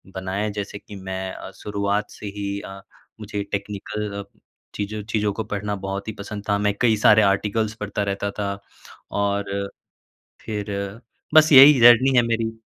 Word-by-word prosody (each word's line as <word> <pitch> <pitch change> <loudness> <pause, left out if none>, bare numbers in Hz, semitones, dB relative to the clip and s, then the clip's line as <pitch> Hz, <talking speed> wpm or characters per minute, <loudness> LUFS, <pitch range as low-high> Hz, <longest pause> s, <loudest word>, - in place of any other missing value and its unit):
बनाया 95 +3 -2
जैसे 100 0 -4
कि 105 - -12
मैं 95 0 -5
अ, - - -9
शुरुआत 100 0 -2
से - - -11
ही 100 0 -3
अ, 95 0 -9 0.4
मुझे 105 -1 -4
टेक्निकल 100 0 -4 0.5
चीज़ 105 +1 -4
चीज़ों 105 -2 +1
को 110 - -3
पढ़ना 105 0 -3
बहुत 100 +1 -4
ही 110 - -3
पसंद 105 0 -6
था। 100 - +3
मैं 100 - +2
कई 115 -3 +4
सारे 105 0 +7
आर्टिकल्स 105 +2 -1
पढ़ता 105 0 -2
रहता 100 +1 -3
था। 100 -1 -2 0.5
और 100 0 0 1.0
फ़िर 105 -1 -4 0.6
बस 155 0 +7
यही 135 0 +9
जर्नी 125 +3 +7
है 120 - +6
मेरी। 115 -1 -2
105 Hz, 155 wpm, -23 LUFS, 100-110 Hz, 1.0 s, यही